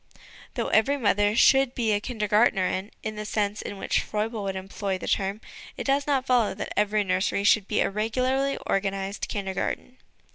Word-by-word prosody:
Though - - -1
every 250 +7 +3
mother 205 -3 +2
should 270 +1 +4
be 230 -3 +1
a 205 - 0
Kinder 220 -3 -3
gdrtnerin, 205 -2 +2
in 215 0 -4
the 210 - -4
sense 210 0 -1
in 200 - -6
which - - 0
Froebel 215 +1 -3
would 195 -1 -2
employ 190 0 -3
the - - -7
term, 200 +2 -1 0.4
it - - -3
does 275 +1 +1
not 270 -3 +1
follow 240 -7 +2
that - - -5
every 210 0 +2
nursery 190 +1 0
should 205 -1 +4
be 210 - +1
a - - +2
regularly 255 +6 0
organised 195 0 -2
Kindergarten. 200 +5 -3
210 Hz, 180 wpm, -26 LUFS, 195-240 Hz, 0.4 s, should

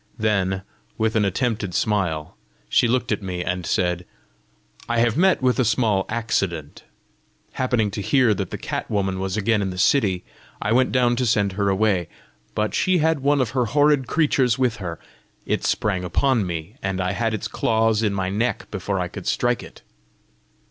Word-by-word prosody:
Then, 95 -3 0 0.3
with 110 0 0
an 105 -2 +3
attempted 100 -2 -1
smile, 90 -8 -1 0.3
she - - +3
looked 125 0 0
at 105 - 0
me, 90 -2 -4
and 90 -1 -3
said, 90 -1 0 0.9
"I 120 - +1
have 115 -1 +2
met 180 -2 +3
with 125 +1 +2
a - - +4
small 110 -4 +1
accident! 100 -9 -2 0.7
Happening 120 -5 0
to 105 - -4
hear 125 0 +3
that 100 - -3
the - - -5
cat - - -4
woman 95 -2 -1
was 95 +1 -2
again 105 0 +2
in 95 - -1
the 90 - -6
city, 95 -3 +2 0.4
I 105 - -1
went 130 +2 +3
down 120 -2 +2
to 125 - +1
send 105 -3 +2
her 100 +1 0
away. 95 -3 +1 0.5
But 105 0 0
she 185 -1 +2
had 160 -1 +2
one 140 +1 +2
of 120 -4 -1
her 125 -2 +1
horrid 145 0 +3
creatures 135 -7 +2
with 125 -3 +1
her: 85 -6 -6 0.5
it - - -1
sprang 95 -4 0
upon 110 +4 +1
me, 85 +6 -5
and 95 -1 -2
had 100 +5 0
its 110 +1 -4
claws 110 0 +1
in 105 -2 +1
my 95 -1 -2
neck 115 +5 -2
before 100 -1 -2
I 90 - -1
could - - -8
strike - - +1
it!" - - -13
110 Hz, 185 wpm, -23 LUFS, 95-125 Hz, 0.9 s, a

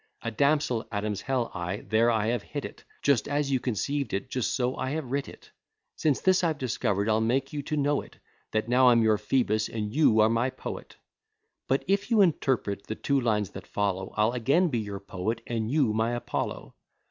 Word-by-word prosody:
A 115 - -2
damsel 140 -1 +1
Adam's 105 -1 -2
hell 130 -3 -1
ay, 90 +3 -4
there 115 +2 +3
I 110 -2 +1
have 120 -2 0
hit 145 +6 -6
it, - - -10 0.2
Just 140 -7 +3
as 145 -1 0
you 130 - +2
conceived 130 +2 -2
it, 125 +7 -5
just 125 -3 -1
so 125 0 0
have 130 - -2 0.2
I - - -10
writ 140 +2 -2
it. - - -15 0.4
Since 150 -4 +1
this 185 -1 +3
I've 160 -3 +1
discover'd, 110 -6 -1
I'll 110 0 +2
make 130 +5 0
you 145 - -2
to 150 +2 -3
know 145 0 +1
it, - - -15 0.3
That 110 0 -1
now 125 +1 +5
I'm 115 -2 +5
your 110 -2 +3
Phoebus, 110 -1 +1
and 105 -2 -4
you 135 -7 +4
are 110 - +6
my 115 +3 +1
poet. - - -8 0.7
But 135 +1 +1
if 200 +3 +1
you 225 -3 +5
interpret 130 - +1
the 110 - -3
two 140 +2 0
lines 105 -5 0
that - - -9
follow, 95 -2 -2
I'll 105 +2 +3
again 140 +9 +2
be 120 -5 -1
your 100 -2 -5
poet, 100 +3 -3
and 115 -2 -2
you 135 -5 +2
my 110 +2 0
Apollo. 120 - -4
120 Hz, 205 wpm, -27 LUFS, 110-140 Hz, 0.7 s, are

